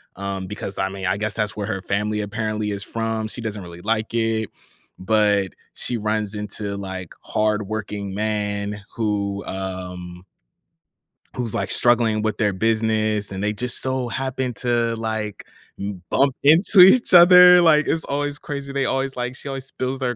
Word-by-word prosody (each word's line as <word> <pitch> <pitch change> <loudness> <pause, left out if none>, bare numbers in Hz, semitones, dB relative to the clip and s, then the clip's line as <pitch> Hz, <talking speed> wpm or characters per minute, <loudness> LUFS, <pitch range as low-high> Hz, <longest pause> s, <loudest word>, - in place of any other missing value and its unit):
um, 95 -1 -4
because, 100 -1 -6
I 95 0 0
mean, 95 -1 -6
I 95 - +1
guess 110 0 -2
that's 105 -2 -2
where 100 0 -3
her 95 -3 -3
family 105 +2 -1
apparently 105 0 -3
is 100 0 -4
from. 110 0 -3
She 120 - -5
doesn't 105 -2 -4
really 85 0 -11
like 110 +2 -1
it, 115 -2 0 0.5
but 105 -1 +2 0.2
she 120 - -2
runs 105 -1 -2
into, 105 -1 -4
like, 95 -3 -7
hardworking 105 -2 -2
man 105 -1 -2 0.2
who, 100 -3 -1
um 90 -2 -6 1.1
who's, 120 -4 -3
like, 95 -1 -1
struggling 115 -3 +3
with 110 -1 -1
their 105 -2 +1
business, 110 0 0
and 95 +1 -4
they 105 - +1
just 125 +4 -2
so 130 -1 -1
happen 130 0 -3
to, 115 0 0
like, 110 -2 -4 0.3
m 100 -2 -5
bump 135 -1 +3
into 175 +6 +6
each 215 +7 +7
other, 180 0 +9
like, 155 -3 +4
it's 160 - 0
always 145 +1 -2
crazy. 140 -2 -6
They 135 -1 0
always 135 0 -1
like 125 0 -3
she - - -8
always 135 -1 -5
spills 130 0 -4
their 125 -2 -2
110 Hz, 165 wpm, -22 LUFS, 100-125 Hz, 1.1 s, other